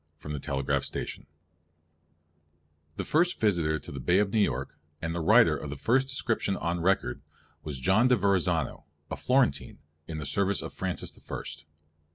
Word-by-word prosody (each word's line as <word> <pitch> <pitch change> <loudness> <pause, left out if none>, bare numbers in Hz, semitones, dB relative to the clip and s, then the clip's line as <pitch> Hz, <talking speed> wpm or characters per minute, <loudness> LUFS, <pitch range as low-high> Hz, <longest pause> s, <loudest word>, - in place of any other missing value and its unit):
The 70 -2 -2 1.8
first 175 +3 +2
visitor 85 -8 +2
to 75 - -9
the 70 - -6
Bay 85 +8 +2
of 100 -1 +1
New 110 - +3
York, 105 - 0 0.2
and 80 0 -3
the 85 - -2
writer 95 -2 +6
of 75 0 -6
the 75 - -5
first 130 - +2
description 115 -6 0
on 85 +1 -2
record, 95 +3 +1 0.4
was 75 -4 -4
John 95 - +4
de 125 - +5
Verrazzano, 100 -5 +1 0.3
a - - -1
Florentine, 125 - +1 0.3
in 80 - -5
the 75 - -4
service 100 0 +1
of - - -7
Francis 95 -1 -3
the - - -18
First. - - -7
95 Hz, 155 wpm, -28 LUFS, 75-110 Hz, 1.8 s, writer